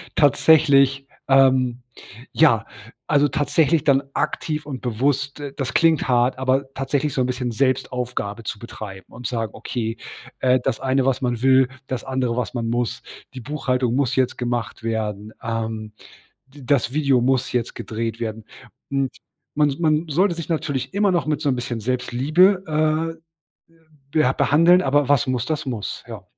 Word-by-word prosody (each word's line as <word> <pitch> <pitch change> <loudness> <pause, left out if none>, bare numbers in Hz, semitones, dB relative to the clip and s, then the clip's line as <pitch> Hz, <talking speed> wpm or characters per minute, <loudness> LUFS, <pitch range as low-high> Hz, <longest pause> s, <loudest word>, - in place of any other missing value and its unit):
tatsächlich, 140 -2 +4 0.2
ähm 130 -2 +4 0.5
ja, 115 -9 +4 0.4
also, 145 0 +3
tatsächlich 150 +1 +1
dann 140 -1 +4
aktiv 150 -1 -2
und 135 -4 -6
bewusst 135 +4 -1
das 130 -4 -3
klingt 165 -4 +3
hart, 125 +1 +2
aber 130 +1 0
tatsächlich 140 +2 -1
so 130 - 0
'n - - +2
bisschen 125 -1 -2
Selbstaufgabe 125 -3 -2
zu 105 0 -5
betreiben 100 -4 -9
und 120 +1 -6
sagen: 115 -3 -3
„Okay, 115 -2 -4 0.4
äh, 130 0 +3
das 115 - -2
eine, 130 0 +1
was 135 -1 +1
man 120 -3 -1
will, 130 0 +4 0.2
das 130 -2 -4
andere, 130 -3 -1
was 125 +1 -3
man 115 -2 -2
muss. 120 0 -2 0.3
Die 130 - -7
Buchhaltung 125 -2 -1
muss 135 -1 +1
jetzt 130 -1 +1
gemacht 120 -2 -3
werden. 110 -2 -3
Ähm, 110 -1 -4 0.5
d 135 +1 -15
das 130 -1 +1
Video 140 -4 +2
muss 130 0 +1
jetzt 120 -2 -2
gedreht 115 0 -4
werden.“ 110 -1 -4 0.5
Hm, 135 -1 0 0.5
man 150 -1 +3
s 140 - -6
man 155 0 +2
sollte 175 +4 +1
sich 170 - -6
natürlich 155 -2 -2
immer 200 0 +3
noch 175 -3 0
mit 150 -1 -1
so 150 - -1
'n 130 - +1
bisschen 120 -2 -4
Selbstliebe, 140 - +2 0.9
äh, 165 - -35 0.4
beh 155 -4 +3
behandeln, 165 +7 +5
aber 140 0 +2
was 140 -4 +3
muss, 125 -2 0
das 155 0 -3
muss, 115 -6 -4
ja. - - -8
130 Hz, 160 wpm, -22 LUFS, 120-145 Hz, 0.9 s, behandeln